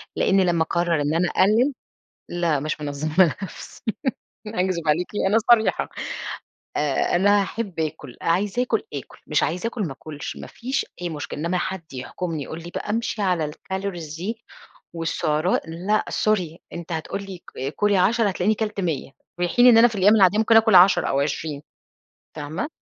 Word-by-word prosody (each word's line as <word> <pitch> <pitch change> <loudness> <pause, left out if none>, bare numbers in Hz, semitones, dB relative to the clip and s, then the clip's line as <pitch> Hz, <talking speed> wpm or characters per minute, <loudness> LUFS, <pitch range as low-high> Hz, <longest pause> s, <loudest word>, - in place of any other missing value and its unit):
لأني 195 0 +3
لمّا 170 -2 +2
أقرر 170 -1 0
إن 145 +1 0
أنا 175 +1 +2
أقلل 230 +8 +3 0.6
لأ، 170 -4 0
مش 155 +2 -3
منظمة 150 +4 +2
نفسي، 195 - -9 0.7
أكذب 185 -6 -1
عليكِ 165 +4 +2 0.2
أنا 210 +3 +4
صريحة 220 -2 +3 0.9
آآ، 150 +3 +1
أنا 205 +2 +4
أحب 195 -3 -4
آكل 150 -5 -4
عايزة 195 +7 +1
أَكل، 235 -3 0
أكل، 140 - -7
مش 150 - +1
عايزة 175 +6 -1
أكل 230 -1 -3
ما 165 -8 -2
أكلش، 150 +1 -7
ما - - -8
فيش 260 +3 -3 0.2
أي 175 - -1
مشكلة 150 -2 -5
إنّما 170 +3 0
حد 175 -3 -4
يحكمني 155 +5 -4
يقول 160 - -7
لي 170 - -8
بقى - - -4
أمشي 225 -1 -1
على 175 -6 +1
الcalories 175 -4 -5
دي 220 +7 -5 0.5
والسعرات، 165 0 0
لأ، 185 +6 0
سوري 180 -6 0
أنت 170 0 -7
هتقول 165 +5 -3
لي 190 -3 -9 0.3
كُلي 205 -1 +2
10 215 +5 +3
هتلاقيني 195 +3 +1
كلت 210 -1 -3
100 160 -7 -2 0.3
في 175 0 +1
حين 245 +8 +5
إن 235 -2 +8
أنا 230 +1 +8
في 225 - -6
الأيّام 205 +2 +5
العاديّة 195 -1 +5
ممكن 225 0 +5
أكل 220 -2 +5
10 185 +2 +7
أو 135 - +1
20 145 0 -2 0.7
فاهمة؟ 155 - -4
180 Hz, 170 wpm, -23 LUFS, 160-210 Hz, 0.9 s, إن